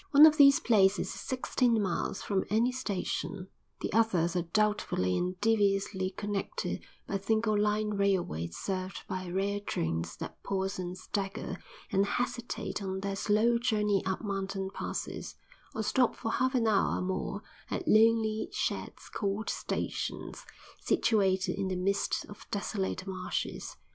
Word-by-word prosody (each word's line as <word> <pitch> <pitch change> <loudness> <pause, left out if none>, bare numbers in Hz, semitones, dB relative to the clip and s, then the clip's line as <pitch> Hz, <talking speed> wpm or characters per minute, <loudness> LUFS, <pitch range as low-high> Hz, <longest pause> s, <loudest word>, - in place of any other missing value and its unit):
One 295 +1 +9
of 305 -1 +6
these 275 -1 +8
places 200 -4 +3
is - - -4
sixteen 250 -2 +1
miles 195 -1 -1
from 195 -2 0
any 230 +4 +3
station; 200 -5 -3 0.3
the - - -3
others 185 -6 +2
are 175 - +2
doubtfully 170 - +1
and 180 - -1
deviously 200 -3 +2
connected 205 - -3 0.2
by 195 - -2
single 220 +2 +1
line 210 +1 +1
railways 180 - 0
served 185 -1 -3
by 185 -1 -4
rare 200 +3 0
trains 85 - -2
that - - -8
pause 190 0 -2
and 180 0 -4
stagger 195 0 -3 0.3
and 195 - +3
hesitate 245 -2 -2
on 190 -1 -3
their 200 0 -2
slow 220 +4 +3
journey 210 -5 +1
up 190 +3 -2
mountain 195 -1 -3
passes, - - -4 0.4
or 220 - -1
stop 250 +3 +2
for 225 - -3
half 260 0 +1
an 240 -2 +3
hour 215 -3 +3
or - - -2
more 190 +2 -3 0.3
at 355 - -3
lonely 220 -1 +4
sheds - - -3
called 205 +1 -2
stations, - - -4 0.3
situated 190 -4 +2
in 195 - 0
the 185 - -1
midst 195 +2 0
of 205 - -12
desolate 200 -3 -2
marshes. 185 -2 -4
200 Hz, 145 wpm, -31 LUFS, 190-220 Hz, 0.4 s, One